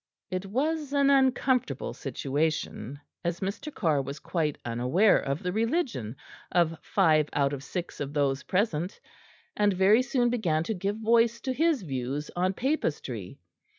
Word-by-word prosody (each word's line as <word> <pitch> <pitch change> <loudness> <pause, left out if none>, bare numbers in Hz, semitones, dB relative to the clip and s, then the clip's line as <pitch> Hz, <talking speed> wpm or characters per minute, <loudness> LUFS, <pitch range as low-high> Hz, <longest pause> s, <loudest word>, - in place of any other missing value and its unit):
It 185 +1 -3
was 290 +6 -1
an 280 -1 +4
uncomfortable 260 - +2
situation, 140 -2 -2 0.2
as 170 0 -1
Mr. 200 +10 -4
Carr 160 - +1
was 140 +2 -6
quite 155 -2 -2
unaware 125 - +3
of 140 +3 -3
the 180 - -1
religion 225 - -1 0.4
of 170 -2 +2
five 155 -6 +3
out 140 -1 +1
of 135 -1 -5
six 175 +3 -5
of 145 -1 -3
those 140 -2 +1
present, 185 -2 -1 0.6
and 205 -1 +3
very 195 +6 +5
soon 245 -1 +1
began 170 -10 +1
to 220 - -2
give 200 +1 -2
voice 230 +1 +3
to 260 - -2
his 315 - +2
views 135 0 -3
on 185 +2 +1
Papistry. 145 - -2
180 Hz, 150 wpm, -28 LUFS, 145-235 Hz, 0.6 s, very